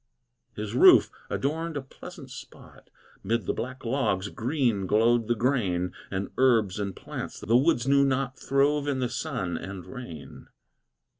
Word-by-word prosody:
His 105 0 -5
roof 125 - +7 0.2
adorned 160 +3 -2
a - - -2
pleasant 135 - -12
spot; - - -13 0.3
Mid 115 0 -1
the - - 0
black 130 +1 -6
logs 110 -6 0
green 115 - -1
glowed 115 +3 +3
the 120 - +1
grain, 100 -8 0 0.2
And 95 0 -3
herbs 115 -7 +3
and 100 -2 -3
plants - - -7
the 115 - +1
woods 130 -2 +3
knew 140 0 +5
not 135 -1 0
Throve 140 +2 +1
in 140 -2 0
the 125 -2 -1
sun 115 - -3
and 95 -1 -7
rain. 120 - -10
120 Hz, 150 wpm, -27 LUFS, 100-135 Hz, 0.3 s, roof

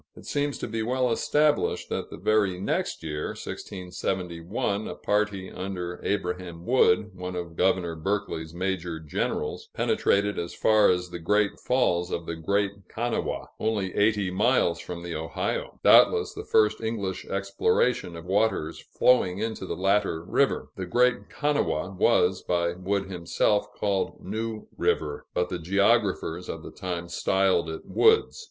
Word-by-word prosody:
It - - -13
seems 145 -1 -1
to - - -4
be 115 - -3
well 125 +2 +1
established 150 +5 +1
that - - -3
the - - -8
very 100 -1 +2
next 95 - -2
year 75 -1 -3
(1671), 90 +1 -3
a - - -5
party 105 -2 -1
under 90 -2 -5
Abraham 90 -3 -3
Wood, 110 -4 +3
one 90 0 -5
of 85 -2 -5
Governor 90 -2 +1
Berkeley's 90 -2 -2
major 90 -2 -3
generals, 80 -2 -3
penetrated 100 +1 +1
as 85 - -5
far 110 -1 +4
as 90 -1 0
the 85 - -5
Great 105 +5 +1
Falls 90 -9 +1
of 85 -2 -3
the 85 - -4
Great 100 +4 -1
Kanawha, 120 +1 -2
only 105 -4 -1
eighty 105 -2 +2
miles 100 -3 +2
from 85 -1 -7
the 85 -1 -5
Ohio 80 +1 -3
doubtless - - +6
the - - -7
first 110 0 +3
English 105 -4 -3
exploration 100 +1 0
of 85 0 -9
waters 100 -4 0
flowing 95 -8 +2
into 110 -2 -3
the - - -3
latter 95 -3 +1
river. - - +1
The 95 - -4
Great 125 +5 +2
Kanawha 145 - 0
was, 95 -1 +3
by 85 -1 0
Wood 95 +2 -1
himself, 95 +3 0
called 100 -2 -1
New 110 +2 -4
River, 75 -2 -1
but 90 0 +1
the 90 - -3
geographers 95 -1 +1
of - - -5
the - - -8
time 85 -2 -4
styled 95 -1 +1
it 80 - -6
Wood's. 445 +2 +3
95 Hz, 150 wpm, -26 LUFS, 85-105 Hz, -, doubtless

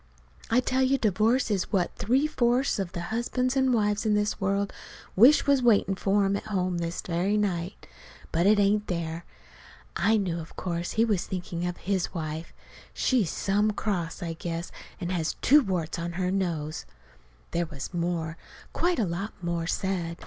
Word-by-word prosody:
I 245 +3 +4
tell 260 +1 0
you 265 +1 +3
divorce 220 +3 +2
is 195 -3 -1
what 185 -4 0
three 255 +7 +2
fourths 250 -4 +1
of 190 -3 -3
the 170 - -4
husbands 250 +3 0
an' 265 -1 +3
wives 210 -3 +1
in 215 -2 +2
the 210 0 +1
world 200 0 0 0.4
wish 250 +10 +7
was 280 -2 +4
waitin' 215 -5 +4
for 195 +1 +1
'em 195 +1 +1
at 200 - -4
home 185 -4 -1
this 170 0 -3
very 185 +4 0
night. 185 -3 -2 0.5
But 170 +3 +2
it 210 +1 +6
ain't 205 +1 +2
there." 170 -1 -3 0.7
I 220 0 +3
knew, 180 -5 -1
of 160 - -10
course, 170 -1 -3
he 225 +1 +3
was 205 -6 0
thinking 175 -1 -3
of 175 - -4
his 190 -1 -2
wife. 160 0 -4 0.4
She's 235 - +2
some 205 +5 +1
cross, 180 -5 -2
I 165 -1 -3
guess, 165 +1 -5 0.3
and 175 0 -3
has 165 -3 -1
two 295 +3 +6
warts 175 - -2
on 170 0 -4
her 180 +1 -1
nose. 165 - -2 0.6
There 170 0 0
was 150 +2 -7
more, 170 -2 -2 0.4
quite 350 +1 +1
a 225 - +2
lot 190 +5 -4
more, 170 -1 -1
said. 175 -3 -2
195 Hz, 180 wpm, -27 LUFS, 170-215 Hz, 0.7 s, wish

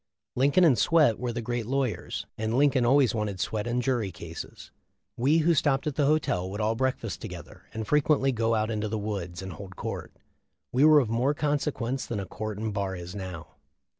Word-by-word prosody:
Lincoln 140 +8 +4
and 145 -8 +5
Swett 155 -10 +4
were 125 -1 -2
the 120 0 -4
great 120 -1 -3
lawyers, 135 -3 -2
and 110 +1 -2
Lincoln 135 -3 +3
always 135 -1 +4
wanted 105 -4 -2
Swett 105 +4 -2
in 120 +1 0
jury 120 -6 0
cases. 85 0 -9 0.4
We 140 +7 +3
who 170 - +5
stopped 140 -3 +1
at 150 - -1
the 140 0 +1
hotel 145 -12 +1
would 100 +2 -5
all 110 +1 +1
breakfast 130 +2 -2
together - - -9
and 110 -1 -5
frequently 150 -2 +3
go 115 -1 +1
out 110 +1 0
into 110 0 -2
the 110 - -2
woods 95 -4 -4
and 95 -1 -6
hold 95 +3 -10
court. - - -5 0.6
We 130 +4 +4
were 155 -1 +8
of 120 - -3
more 130 +6 +1
consequence 145 -4 -1
than 115 - -3
a 100 - -4
court 105 +3 -5
and 110 0 -3
bar 100 -2 -2
is 90 0 -7
now. 95 -5 -7
115 Hz, 200 wpm, -27 LUFS, 105-135 Hz, 0.6 s, were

